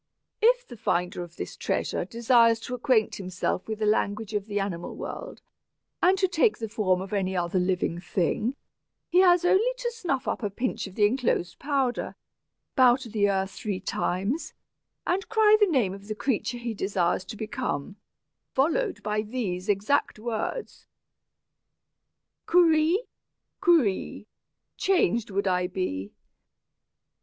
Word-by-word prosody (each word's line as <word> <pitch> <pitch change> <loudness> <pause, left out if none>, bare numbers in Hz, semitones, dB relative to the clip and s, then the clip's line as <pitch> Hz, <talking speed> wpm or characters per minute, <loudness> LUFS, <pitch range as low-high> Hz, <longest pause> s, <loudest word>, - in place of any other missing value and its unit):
"If - - +4
the 240 - -10
finder 180 -3 -1
of 175 -1 -9
this - - -6
treasure - - -1
desires 230 -1 +4
to 245 - -6
acquaint 245 -3 +1
himself 185 -1 -3
with 220 -1 -3
the 215 - -1
language 210 0 0
of 205 0 -2
the 205 -1 -1
animal 185 -4 -4
world, - - -7 0.6
and 370 +2 +4
to 380 0 +2
take 365 +5 +2
the 225 - -4
form 200 -4 +1
of 190 +2 -7
any 190 -2 0
other 175 +1 0
living 180 -2 0
thing, 190 - -1 0.5
he 360 - +4
has 355 -2 +5
only 410 +7 +4
to 485 -1 -2
snuff 330 - -2
up - - -1
a 205 - -1
pinch 235 +2 -3
of 190 - -12
the 210 - +4
enclosed 215 -7 0
powder, 270 -3 -1 0.6
bow 255 -3 +6
to 260 -2 -8
the 205 -1 +2
earth 195 0 0
three 200 -2 -4
times, 195 - -2 0.5
and 375 +2 -1
cry 435 -1 +5
the 415 - +5
name 250 - +1
of 200 +1 -11
the 215 - -3
creature 245 0 -1
he 235 -1 -4
desires 190 -3 0
to 220 - -8
become, 215 - -4 0.6
followed 340 - +1
by 210 0 0
these 210 -5 -4
exact 205 +7 +1
words: 235 - -4 1.6
'Kurri 330 0 +4 0.6
kuree, 285 - +2 0.5
Changed 235 - +2
would 200 0 -1
I 180 -1 +1
be.' 140 - -3
220 Hz, 150 wpm, -27 LUFS, 195-285 Hz, 1.6 s, bow